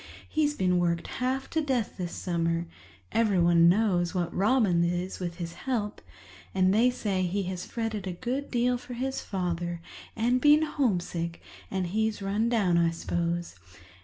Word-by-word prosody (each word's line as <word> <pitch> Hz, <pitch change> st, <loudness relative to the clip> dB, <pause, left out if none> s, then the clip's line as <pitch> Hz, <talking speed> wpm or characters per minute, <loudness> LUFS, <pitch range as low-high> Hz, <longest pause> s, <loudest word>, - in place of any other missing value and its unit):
He's 295 Hz, -2 st, +1 dB
been 180 Hz, -5 st, +2 dB
worked 170 Hz, -1 st, 0 dB, 0.2 s
half 260 Hz, +1 st, 0 dB
to 320 Hz, -, +1 dB
death 260 Hz, -7 st, -1 dB
this 175 Hz, -1 st, -3 dB
summer—everyone 170 Hz, -, +1 dB
knows 185 Hz, -2 st, +2 dB
what 175 Hz, -2 st, -1 dB
Robins 195 Hz, -5 st, +3 dB
is 180 Hz, +1 st, -3 dB
with 175 Hz, -2 st, -4 dB
his 170 Hz, -2 st, -5 dB
help—and 100 Hz, -, -2 dB
they 230 Hz, +4 st, +5 dB
say 205 Hz, -6 st, -1 dB
he 185 Hz, +2 st, 0 dB
has 180 Hz, -1 st, -5 dB
fretted 225 Hz, -4 st, -3 dB
a 185 Hz, -, -2 dB
good 255 Hz, +9 st, -3 dB
deal 245 Hz, 0 st, +1 dB
for 245 Hz, 0 st, -8 dB
his 265 Hz, +2 st, -2 dB
father 175 Hz, -2 st, -3 dB, 0.4 s
and 245 Hz, +3 st, +2 dB
been 295 Hz, +2 st, +6 dB
homesick, 180 Hz, -, -1 dB, 0.3 s
and 190 Hz, -1 st, -1 dB
he's 215 Hz, +4 st, 0 dB
run 205 Hz, +4 st, 0 dB
down, 195 Hz, -8 st, +3 dB
I 170 Hz, -1 st, +4 dB
s'pose. 170 Hz, +1 st, -2 dB
185 Hz, 150 wpm, -28 LUFS, 170-235 Hz, 0.4 s, been